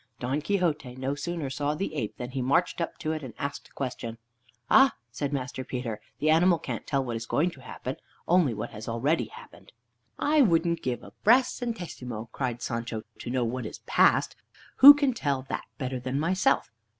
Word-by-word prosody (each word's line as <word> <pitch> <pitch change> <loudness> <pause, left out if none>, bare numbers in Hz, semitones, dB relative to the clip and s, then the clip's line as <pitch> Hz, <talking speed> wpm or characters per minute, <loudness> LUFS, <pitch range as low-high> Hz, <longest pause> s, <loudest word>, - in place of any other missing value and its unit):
Don 130 +4 -1
Quixote 155 -8 -1
no 130 +1 -2
sooner 145 -1 -4
saw 145 +2 -1
the 180 0 -3
ape, 115 -9 -3
than 125 0 -6
he 130 0 -2
marched 140 +7 +1
up 170 - -3
to 155 - -2
it, 155 -1 -3
and 125 -6 -9
asked 140 0 -5
a - - -29
question. 120 -4 -4 0.5
"Ah!" 270 0 +6 0.2
said 140 +4 -3
Master 130 -2 -3
Peter, 120 -4 -4 0.2
"the 155 +1 +2
animal 170 +2 +5
can't - - -6
tell 135 -2 0
what 120 -2 -3
is 115 0 -5
going 170 +9 +1
to 135 - -14
happen; 130 0 -6 0.3
only 175 -6 +4
what 105 -1 -5
has 110 +2 -7
already 135 +8 +1
happened." 465 +2 -14 0.5
"I 300 +1 +3
wouldn't 170 -6 +3
give 125 -3 -3
a - - -12
brass 245 +4 +5
centesimo," 135 - -5
cried 120 -3 -3
Sancho, 115 -2 -3 0.2
"to - - -6
know 125 -1 0
what 120 0 -3
is - - -8
past. - - +3 0.4
Who 285 +2 +12
can 285 -3 +1
tell 140 - -1
that - - -3
better 130 -2 -3
than 130 +3 -2
myself? 170 - +1
140 Hz, 195 wpm, -27 LUFS, 125-170 Hz, 0.5 s, Who